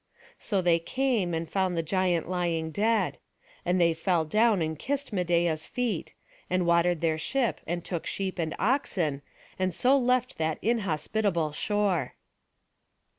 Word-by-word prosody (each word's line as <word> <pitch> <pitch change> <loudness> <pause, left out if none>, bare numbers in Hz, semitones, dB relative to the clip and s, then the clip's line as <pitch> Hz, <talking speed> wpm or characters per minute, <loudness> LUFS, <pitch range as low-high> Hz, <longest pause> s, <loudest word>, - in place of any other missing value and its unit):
So 195 -4 -1
they 170 -1 +4
came, 220 -2 0
and 165 0 -3
found 185 0 0
the 165 - +1
giant 175 0 0
lying 170 -3 -1
dead; 210 +1 +1 0.4
and 180 +1 +1
they 170 -1 +4
fell 165 0 +1
down, 215 +4 +3
and 160 -2 -2
kissed 280 -3 -3
Medeia's 170 -3 +1
feet; 240 -8 -3 0.3
and 185 -1 +1
watered 170 0 +3
their 160 -1 +1
ship, 235 - 0
and 175 0 -3
took 170 -3 -4
sheep 190 -1 -3
and 160 -2 -1
oxen, 185 - 0 0.4
and 185 -2 0
so 260 +2 +4
left 250 -6 +1
that 160 -1 0
inhospitable 195 -5 0
shore. 195 - 0
180 Hz, 145 wpm, -28 LUFS, 165-210 Hz, 0.4 s, they